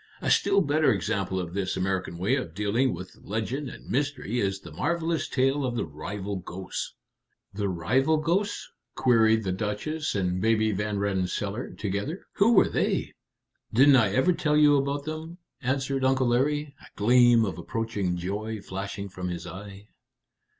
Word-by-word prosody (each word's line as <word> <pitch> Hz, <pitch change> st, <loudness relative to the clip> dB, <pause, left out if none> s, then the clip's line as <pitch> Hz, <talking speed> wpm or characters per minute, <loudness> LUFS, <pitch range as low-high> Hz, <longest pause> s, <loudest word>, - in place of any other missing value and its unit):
A -, -, -1 dB
still 200 Hz, 0 st, +4 dB
better 150 Hz, -2 st, +3 dB
example 95 Hz, -1 st, -1 dB
of 85 Hz, -2 st, -5 dB
this 95 Hz, -1 st, -2 dB
American 95 Hz, -2 st, -2 dB
way 95 Hz, +8 st, +1 dB
of 85 Hz, -, -4 dB
dealing 110 Hz, +6 st, +1 dB
with 90 Hz, +2 st, -8 dB
legend 120 Hz, +7 st, -3 dB
and -, -, -12 dB
mystery 130 Hz, -3 st, -1 dB
is 95 Hz, -2 st, 0 dB
the 85 Hz, -, -11 dB
marvelous 165 Hz, -, -1 dB
tale 135 Hz, +2 st, +1 dB
of 125 Hz, -2 st, -1 dB
the -, -, -1 dB
rival 100 Hz, +6 st, -5 dB
ghosts." 90 Hz, +1 st, -6 dB, 0.6 s
"The 100 Hz, 0 st, -1 dB
rival 125 Hz, -, +2 dB
ghosts!" 180 Hz, +7 st, -1 dB, 0.3 s
queried 110 Hz, -2 st, +4 dB
the 95 Hz, -, -1 dB
Duchess 105 Hz, +12 st, -2 dB
and 90 Hz, -2 st, 0 dB
Baby 110 Hz, 0 st, +3 dB
Van 105 Hz, +1 st, -2 dB
Rensselaer 100 Hz, +3 st, -2 dB
together. 105 Hz, -, -3 dB
"Who 220 Hz, +4 st, +5 dB
were 205 Hz, -, +6 dB
they?" -, -, 0 dB, 0.6 s
"Didn't 135 Hz, +4 st, +6 dB
I 115 Hz, -5 st, +4 dB
ever 170 Hz, -, +3 dB
tell 150 Hz, -2 st, +1 dB
you 150 Hz, -1 st, +6 dB
about 140 Hz, +1 st, 0 dB
them?" 155 Hz, +3 st, -6 dB, 0.2 s
answered 135 Hz, +1 st, -1 dB
Uncle 130 Hz, -1 st, +3 dB
Larry, 145 Hz, +4 st, +1 dB
a -, -, -14 dB
gleam 120 Hz, +1 st, +5 dB
of 95 Hz, -3 st, -4 dB
approaching 100 Hz, -2 st, -2 dB
joy 105 Hz, +5 st, -3 dB
flashing 100 Hz, +1 st, -5 dB
from 90 Hz, -1 st, -6 dB
his 85 Hz, -1 st, -5 dB
eye. 100 Hz, +1 st, -9 dB
110 Hz, 160 wpm, -27 LUFS, 95-140 Hz, 0.6 s, were